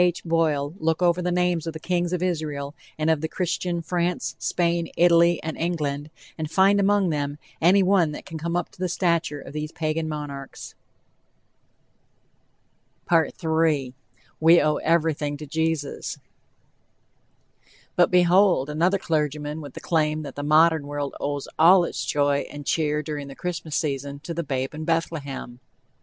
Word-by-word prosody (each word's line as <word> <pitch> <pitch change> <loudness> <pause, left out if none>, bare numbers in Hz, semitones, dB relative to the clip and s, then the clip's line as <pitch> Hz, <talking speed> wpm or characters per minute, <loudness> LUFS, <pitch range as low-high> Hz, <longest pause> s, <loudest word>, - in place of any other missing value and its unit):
H. 175 -1 0
Boyle 155 -3 +1
look 160 +2 0
over 175 0 +3
the 180 0 -1
names 175 -2 0
of 165 - -3
the 160 - -7
kings 175 +1 -1
of 180 -1 -1
Israel 150 -5 -2 0.2
and 155 +1 +2
of 160 -1 0
Christian 175 -1 -2
France, 175 -6 -1
Spain, 170 -1 0
Italy 170 0 +5
and 160 -1 -4
England, 150 -4 -2 0.3
and 155 -1 -3
find 195 +4 +4
among 200 -2 +3
them 145 -1 -2 0.2
any 190 +4 +5
one 185 -4 +3
that - - -8
can 165 -3 -7
come 170 +2 -2
up 175 -1 -1
to - - -22
the 185 -1 -1
stature 170 -4 0
of 140 - -10
these 150 0 -4
Pagan 155 0 -2
monarchs. 145 -3 -7 2.4
"WE 160 -4 +1 0.7
OWE 150 0 +2
EVERYTHING 155 -3 0
TO 150 - -8
JESUS" 160 -1 -2 1.8
But, 175 - +4
behold! 180 -4 +4
another 175 +6 +2
clergyman 150 -3 -2
with 145 -3 -10
the - - -6
claim 155 -2 0
that 145 - -7
the 145 - -4
modern 155 0 +4
world 145 -1 -3
owes 145 -1 -3
all 175 +3 +7
its - - -3
joy 145 -1 +1
and 145 -1 -9
cheer, 150 -1 0
during 150 -2 -5
the 135 - -9
Christmas 165 -4 -4
season, 140 -2 -2
"to 170 - -5
the 170 - -2
babe 135 -3 -3
in 155 +1 -6
Bethlehem." 140 -7 -3
160 Hz, 155 wpm, -24 LUFS, 145-175 Hz, 2.4 s, all